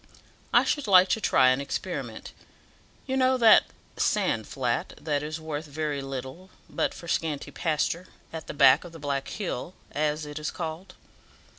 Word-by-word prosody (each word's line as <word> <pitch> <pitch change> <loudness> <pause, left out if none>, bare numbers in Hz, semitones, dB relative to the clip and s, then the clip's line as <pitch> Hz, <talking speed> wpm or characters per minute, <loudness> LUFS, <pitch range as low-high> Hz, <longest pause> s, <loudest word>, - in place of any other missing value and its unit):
I - - +6
should 290 -6 -1
like 185 -1 +7
to 220 - +1
try 130 -9 +5
an 130 +2 +2
experiment. 140 - -5 0.7
You 265 - -2
know 260 0 +3
that 230 -3 +7 0.3
sand - - +1
flat, - - -2
that 145 -2 -1
is 155 +2 -5
worth 155 -1 -5
very 145 -1 -3
little 135 +7 -7 0.2
but - - -1
for 170 - -10
scanty 155 -3 -2
pasture, 170 +2 -1 0.3
at 160 -1 -7
the - - -5
back 135 -3 +6
of 175 -2 -11
the - - -9
Black 140 -2 -3
Hill, 185 -4 -5 0.2
as 150 0 -1
it 150 +1 -6
is 150 - -3
called. 175 +3 -6
155 Hz, 165 wpm, -27 LUFS, 145-180 Hz, 0.7 s, like